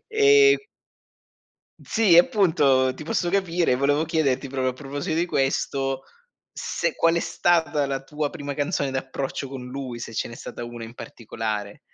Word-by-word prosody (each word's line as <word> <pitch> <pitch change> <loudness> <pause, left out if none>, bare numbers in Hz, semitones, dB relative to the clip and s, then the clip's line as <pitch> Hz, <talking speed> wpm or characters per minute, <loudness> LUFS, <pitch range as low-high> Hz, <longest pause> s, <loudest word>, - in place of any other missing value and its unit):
ehm 425 -1 +6 1.2
Sì, 215 -7 +3
appunto, 160 - +4
ti 155 - -9
posso 175 +3 -1
capire, 175 -5 +1
e - - +2
volevo 145 +4 +1
chiederti, 150 -5 0
proprio 130 -1 -1
a - - -7
proposito 145 +5 -4
di 175 - +1
questo, 135 -2 -1 0.5
se - - -2
qual 165 0 +3
è - - +2
stata 160 -5 +1
la 135 -1 -3
tua 150 +1 -3
prima 145 -4 -6
canzone 145 -1 -1
d'approccio 135 +1 -4
con 130 -2 -8
lui, 125 -2 -6
se 115 -1 -7
ce - - -2
n'è 120 - -9
stata 120 - -8
una 120 -1 -7
in 115 +1 -11
particolare. 110 -4 -5
140 Hz, 160 wpm, -24 LUFS, 130-170 Hz, 1.2 s, ehm